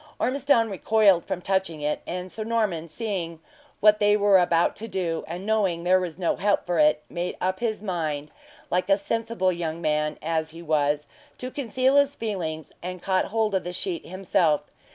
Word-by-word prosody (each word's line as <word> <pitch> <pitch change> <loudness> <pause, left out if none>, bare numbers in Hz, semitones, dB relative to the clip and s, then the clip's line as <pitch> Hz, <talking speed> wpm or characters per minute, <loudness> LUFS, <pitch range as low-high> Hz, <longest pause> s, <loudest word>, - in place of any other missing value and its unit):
Ormiston 255 -2 +2
recoiled 200 -2 +3
from 180 - -4
touching 190 -5 -1
it; 150 0 -1
and 180 +1 -4
Sir 220 - -4
Norman 215 -8 -1
seeing 170 -3 -4 0.4
what 210 0 +6
they 205 0 +4
were 200 -2 +5
about 170 -1 +2
to 225 - -6
do, 175 -6 -2
and 175 +4 -6
knowing 200 -6 +1
there 185 +1 +4
was 175 -3 -4
no 175 -3 0
help 205 0 +1
for 175 -2 0
it, 150 0 +4
made 175 +1 -4
up 185 +1 -1
his 220 -3 -2
mind, 155 -6 -3 0.4
like 180 +2 0
a 195 - +5
sensible 225 -2 -1
young 170 -2 -3
man 150 -2 0
as 160 0 -1
he 165 +1 -11
was, 150 -2 +1 0.3
to 255 +1 -5
conceal 260 +1 +1
his 285 0 +3
feelings, 165 -8 -4
and 180 0 -6
caught 190 -1 +1
hold 220 0 0
of 190 - +1
the 175 +1 -5
sheet 345 - -2
himself. 180 -5 +1
185 Hz, 185 wpm, -25 LUFS, 165-215 Hz, 0.4 s, what